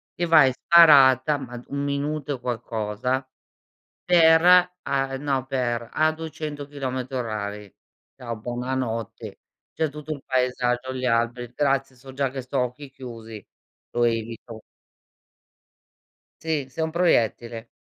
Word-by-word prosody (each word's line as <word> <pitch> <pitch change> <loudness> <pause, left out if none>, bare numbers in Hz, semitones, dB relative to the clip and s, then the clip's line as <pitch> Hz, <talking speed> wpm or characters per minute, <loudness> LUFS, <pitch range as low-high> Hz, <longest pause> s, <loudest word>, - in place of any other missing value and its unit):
che 175 - -1
vai 160 -5 +6
in 130 - 0
sparata, 145 -3 +6
ma 125 -3 -8
d 120 - -12
1 140 0 -3
minuto 145 +1 -2
e - - -24
qualcosa, 120 +1 -3 0.8
per 160 -2 +6 0.4
a 135 -1 -1
no, 135 -2 -1
per 120 -3 -2
a 155 0 +2
200 155 -2 -6
chilometri 130 -2 -5
orari. 105 -4 -4 0.4
Ciao, 120 -3 -6
buonanotte. 120 -1 -4 0.3
C'è 160 - -1
tutto 150 +1 -8
il 145 - -10
paesaggio, 125 0 -1
gli 130 0 -4
alberi. 120 0 0
Grazie, 135 0 0
so 130 +1 -13
già 135 0 0
che 135 +1 -6
sto 130 +2 -5
a - - +3
occhi 130 +3 -10
chiusi. 115 -5 -10 0.5
Lo 120 - +2
evito. 115 -1 -3 1.8
Sì, 155 -4 -2
sei 160 +5 -3
un 160 - -2
proiettile. 120 -8 0
130 Hz, 135 wpm, -24 LUFS, 120-145 Hz, 1.8 s, vai